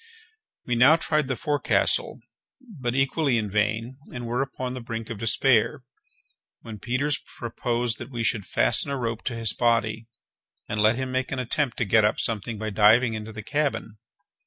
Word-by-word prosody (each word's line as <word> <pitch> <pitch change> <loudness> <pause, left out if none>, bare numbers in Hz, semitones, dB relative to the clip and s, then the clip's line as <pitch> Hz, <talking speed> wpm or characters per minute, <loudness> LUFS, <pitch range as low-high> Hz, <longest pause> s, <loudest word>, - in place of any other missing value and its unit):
We 125 - -1
now 125 +6 +6
tried 155 -3 0
the 130 - -1
forecastle, 145 +2 0 0.4
but 150 - -5
equally 135 -1 +2
in 105 -3 -2
vain, 110 +5 -1
and 120 -1 -6
were 120 +3 -1
upon 130 -2 -4
the 130 - -6
brink 115 -1 -6
of 110 - -6
despair, 115 +2 +2 0.8
when 110 -3 -9
Peters 130 +6 -1 0.2
proposed 120 0 -2
that 120 - -7
we 120 -3 -3
should 105 -4 -1
fasten - - +1
a 140 - -2
rope 115 -3 -3
to 120 - -2
his 115 -1 -1
body, 115 -1 +1 0.6
and 105 0 -1
let 110 +2 +4
him 130 +1 -3
make 130 0 -1
an 135 - -2
attempt 130 +1 -1
to 120 - 0
get 110 +2 +4
up 105 - +2
something 110 0 -1
by 110 0 -4
diving 110 +4 +5
into 110 0 -6
the 105 -1 -8
cabin. 140 -5 -2
120 Hz, 180 wpm, -25 LUFS, 110-130 Hz, 0.8 s, now